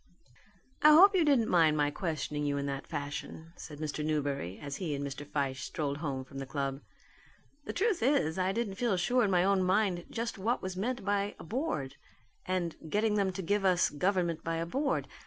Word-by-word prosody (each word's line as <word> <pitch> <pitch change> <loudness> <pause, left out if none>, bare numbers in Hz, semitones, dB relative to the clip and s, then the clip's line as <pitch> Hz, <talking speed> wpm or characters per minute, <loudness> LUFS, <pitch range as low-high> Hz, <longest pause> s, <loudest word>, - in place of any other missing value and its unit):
"I 305 - +8
hope 390 +6 +8
you 365 -3 +4
didn't 275 -7 +3
mind 160 -3 +4
my 145 -1 +2
questioning 150 -3 -3
you 145 -1 0
in 140 - -2
that 140 -1 -4
fashion," 150 +2 -6
said 150 -4 -9
Mr. 150 0 -3
Newberry, 140 - -2
as 140 -1 -5
he 160 -6 -2
and 140 0 -3
Mr. 140 +1 -6
Fyshe 140 -3 -2
strolled 145 -3 -3
home 140 -4 -3
from 135 +1 -9
the 135 - -5
club. 140 -1 -3 0.8
"The - - -4
truth 405 0 +1
is 210 - +2
I 185 +1 +1
didn't 205 -2 -2
feel 230 -6 +2
sure 245 +8 +2
in 205 - +2
my 180 -2 +3
own 195 0 +3
mind 185 -1 +1
just 230 -3 -4
what 230 +6 0
was 185 0 -5
meant 240 +3 -2
by 205 0 0
a - - -10
'Board,' 210 - -3 0.5
and 175 -3 -1
'getting 210 +4 +1
them 200 -2 +1
to 190 +1 -5
give 205 +3 +1
us 180 -2 +3
government 170 0 0
by 165 0 -2
a 165 0 -2
Board.' 275 - -1
175 Hz, 205 wpm, -31 LUFS, 145-205 Hz, 0.8 s, I